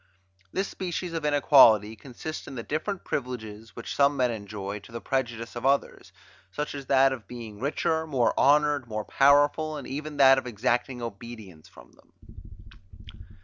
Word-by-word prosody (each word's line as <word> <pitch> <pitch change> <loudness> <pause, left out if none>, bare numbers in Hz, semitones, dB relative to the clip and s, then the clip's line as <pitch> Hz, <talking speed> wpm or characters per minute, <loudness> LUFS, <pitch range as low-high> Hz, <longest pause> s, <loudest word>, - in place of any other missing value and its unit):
This 195 +1 -1
species 180 -1 -5
of 165 -2 -3
inequality 120 -7 +5
consists 140 +6 -8
in - - -8
the 115 - -5
different 175 - -3
privileges, 110 -4 -5
which 115 - -6
some 140 0 +3
men 125 -2 +2
enjoy, 100 -2 -6
to 100 - -16
the 115 - -6
prejudice 115 -3 -3
of 120 - -6
others, 140 +1 0 0.4
such 150 +6 -4
as 140 -2 -8
that 135 0 +4
of 120 -5 -9
being 115 -4 -9
richer, 160 +4 -1
more 130 -6 +1
honoured, 145 -2 +3
more 110 -1 -4
powerful, 145 +2 +3
and 140 - -8
even 150 +2 -6
that 135 -1 +7
of 130 - -9
exacting 120 +2 -1
obedience 110 -7 -9
from - - -17
them. - - -26
130 Hz, 160 wpm, -27 LUFS, 115-145 Hz, 0.4 s, that